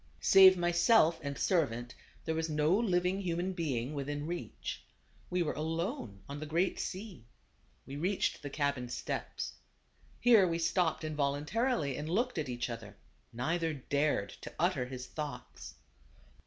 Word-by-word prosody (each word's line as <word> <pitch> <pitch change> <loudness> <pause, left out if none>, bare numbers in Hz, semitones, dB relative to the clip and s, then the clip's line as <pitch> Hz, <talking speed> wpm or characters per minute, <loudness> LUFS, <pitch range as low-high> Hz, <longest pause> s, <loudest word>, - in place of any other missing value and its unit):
Save 190 -1 +8
myself 175 0 +4
and 140 -2 -4
servant 125 -9 0 0.3
there 160 - 0
was 160 0 -1
no 155 +3 +3
living 185 -3 +1
human 180 +1 -1
being 145 -6 -2
within 145 +1 -3
reach. 175 +2 -5 0.5
We 180 -1 +1
were 155 - -1
alone 155 - -3
on 140 +1 -6
the 155 - -5
great 170 +5 +1
sea. 185 - -6 0.6
We 135 +1 -7
reached 185 +6 0
the 145 - -5
cabin 140 -4 -1
steps. - - -4 0.7
Here 225 -6 +6
we 165 -1 0
stopped 170 0 +1
in 155 -1 -3
voluntarily, 145 - 0
and 150 +1 -4
looked 235 +2 0
at 150 -4 -3
each 120 -1 -2
other; 110 -4 -8 0.3
neither 160 +7 -1
dared 140 -6 0
to - - -7
utter 155 -7 +1
his 125 -1 -6
thoughts. 150 - -7
155 Hz, 145 wpm, -32 LUFS, 140-180 Hz, 0.7 s, Save